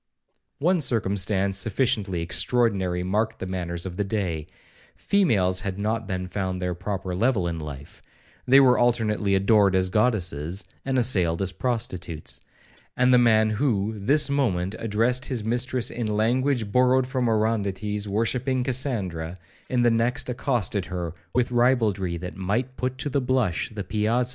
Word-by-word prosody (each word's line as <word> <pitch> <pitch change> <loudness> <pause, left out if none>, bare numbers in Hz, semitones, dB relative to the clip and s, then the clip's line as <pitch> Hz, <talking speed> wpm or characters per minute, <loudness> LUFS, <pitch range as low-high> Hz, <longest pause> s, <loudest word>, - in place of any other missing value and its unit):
'2 145 - -6
One 180 -1 +3
circumstance 100 -5 +1
sufficiently 105 -5 0
extraordinary 95 -2 +1
marked 110 +4 -1
the - - -5
manners 85 -2 -3
of 90 -1 -6
the 105 - +1
day; 95 -7 -3 0.5
females 100 - +1
had 95 -1 -4
not 110 +2 -2
then 95 -2 -3
found 95 -1 -3
their 90 -1 -2
proper 95 +1 -4
level 100 -1 +1
in 85 -1 -3
life; 75 -2 -9 0.5
they 135 +2 +7
were 130 -2 +5
alternately 110 -4 +1
adored 100 0 +4
as 95 0 +2
goddesses, 95 - 0 0.2
and 135 -1 -1
assailed 95 -10 +2
as 95 -1 -1
prostitutes; 90 -8 -4 0.6
and 125 0 +4
the 125 - +7
man 110 -2 +4
who, 110 -3 0
this 140 +9 +2
moment, 105 -10 0
addressed 115 +4 0
his 125 -5 -3
mistress 120 +2 -1
in 120 -2 -3
language 115 +2 0
borrowed 125 +1 +3
from 130 -1 -1
Orondates 105 -2 -1
worshipping 125 +5 0
Cassandra, 100 - -1 0.3
in 125 -1 +1
the 120 - +4
next 115 +3 0
accosted 120 -6 -1
her 90 -3 -4 0.2
with 125 -1 +1
ribaldry 110 -8 +1
that 90 +2 -7
might 115 +7 -2
put 130 0 -3
to 145 - -2
the 140 - +1
blush 125 -8 0
the 105 -2 -6
piazzas 100 +4 -6
of - - +1
Covent - - +2
Garden. 125 -1 +1
105 Hz, 160 wpm, -25 LUFS, 95-125 Hz, 0.6 s, they